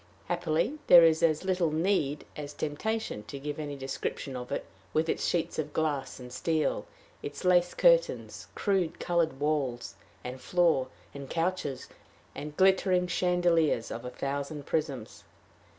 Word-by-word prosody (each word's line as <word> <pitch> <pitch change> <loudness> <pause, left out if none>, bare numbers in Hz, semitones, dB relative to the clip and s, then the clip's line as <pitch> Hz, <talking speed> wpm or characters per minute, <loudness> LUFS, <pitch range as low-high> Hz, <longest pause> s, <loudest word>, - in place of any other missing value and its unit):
Happily 175 - 0
there 175 -1 +10
is 160 -1 +4
as 160 -1 +2
little 180 -3 +2
need 155 -3 0
as 145 -1 -6
temptation 215 - -3
to 140 - -7
give 145 +2 -5
any 145 -2 -4
description 135 0 -4
of 125 0 -6
it, - - -2 0.3
with 160 +1 +2
its - - 0
sheets 170 -2 -1
of 150 -1 -3
glass 145 -5 -1
and 125 -1 -10
steel, 160 +1 0 0.3
its 430 - -6
lace 180 -1 +4
curtains, - - +2
crude 190 -5 0
colored 165 -5 0
walls 145 -5 -1 0.3
and 125 +1 -6
floor 165 -3 +2 0.3
and 140 -1 -8
couches, 165 -6 -2 0.5
and 150 0 -7
glittering 190 -1 +4
chandeliers 175 -7 +2
of 115 - -5
a 125 - -4
thousand 140 +2 -4
prisms. 140 -8 -3
155 Hz, 145 wpm, -29 LUFS, 140-175 Hz, 0.5 s, there